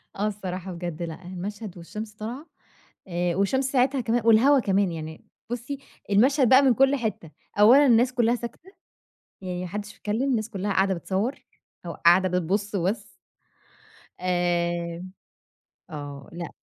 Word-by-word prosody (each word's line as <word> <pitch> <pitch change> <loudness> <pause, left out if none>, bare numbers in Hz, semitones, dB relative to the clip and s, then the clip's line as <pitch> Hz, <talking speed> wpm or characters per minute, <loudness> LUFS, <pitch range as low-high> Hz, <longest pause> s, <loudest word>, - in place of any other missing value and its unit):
آه 205 +2 0
الصراحة 190 -3 -5
بجد 175 -2 -6
لأ، 165 +1 -6
المشهد 190 +2 -6
والشمس 210 +5 -7
طالعة 235 +8 -7 0.6
آآ، 175 0 -1
والشمس 230 +8 +1
ساعتها 265 +1 +2
كما 230 -1 0
والهوا 255 +5 +6
كمان 195 -3 +1
يعني، 160 -1 -7 0.3
بُصّي 245 +4 -4 0.3
المشهد 255 +5 +4
بقى 265 +2 +7
من 260 -3 +4
كُلّ 270 +4 +4
حتّة، 215 - -4 0.3
أولًا 255 +8 +7
الناس 245 +1 +4
كلّها 240 -1 +2
ساكتة، 245 - -8 0.7
يعني 180 -1 -4
ما - - -4
حدش 205 +3 -6
بيتكلّم، 215 +4 -2
الناس 225 -3 -1
كلّها 200 -1 -2
قاعدة 190 0 +2
بتصوّر 195 - -3 0.4
أو 170 - -4
قاعدة 175 +3 +4
بتبص 200 +4 -2
وبس. 200 +3 -1 1.1
آآ، 175 -1 -1 0.9
آه 145 -3 -8
لأ. 170 -1 -5
205 Hz, 140 wpm, -25 LUFS, 175-235 Hz, 1.1 s, بقى